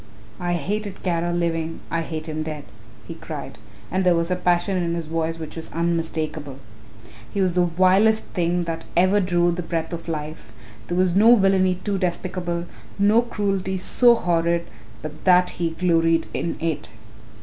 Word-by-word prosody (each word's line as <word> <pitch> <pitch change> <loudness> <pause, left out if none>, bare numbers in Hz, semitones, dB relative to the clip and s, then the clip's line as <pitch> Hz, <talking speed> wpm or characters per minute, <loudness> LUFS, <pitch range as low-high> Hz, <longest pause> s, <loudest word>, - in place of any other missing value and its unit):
I 175 0 -1
hated 200 +4 -3
Kara 175 -1 0
living, 165 -1 -1
I 165 - 0
hate 160 -1 -5
him 155 0 -3
dead," 155 -2 -5 0.4
he - - -6
cried, - - -8 0.3
and 190 +1 +1
there 180 -1 +4
was 170 +1 -1
a - - +2
passion 180 +1 +1
in 170 -1 -1
his 170 -1 -3
voice 165 +1 -2
which 160 -2 -8
was 165 - -7
unmistakable; 160 -4 -2 0.7
"he 200 - -3
was 185 -2 +2
the 180 0 +3
vilest 190 +6 +3
thing 175 -1 0
that 165 -1 -4
ever 185 +3 +4
drew 175 -2 +2
the 175 +1 -3
breath 165 0 -3
of 170 0 -6
life. 155 -1 -5 0.4
There 175 - -2
was 185 -1 +2
no 225 +4 +7
villainy 190 -3 +3
too 200 -2 -1
despicable, 175 -1 -2 0.3
no 210 +3 +4
cruelty 195 -5 -2
so 240 +6 +4
horrid 170 -4 +1 0.4
but 155 0 -8
that 180 -1 +5
he 170 - +2
gloried 165 -1 +2
in 170 - -2
it. 165 -2 -2
175 Hz, 170 wpm, -23 LUFS, 165-185 Hz, 0.7 s, no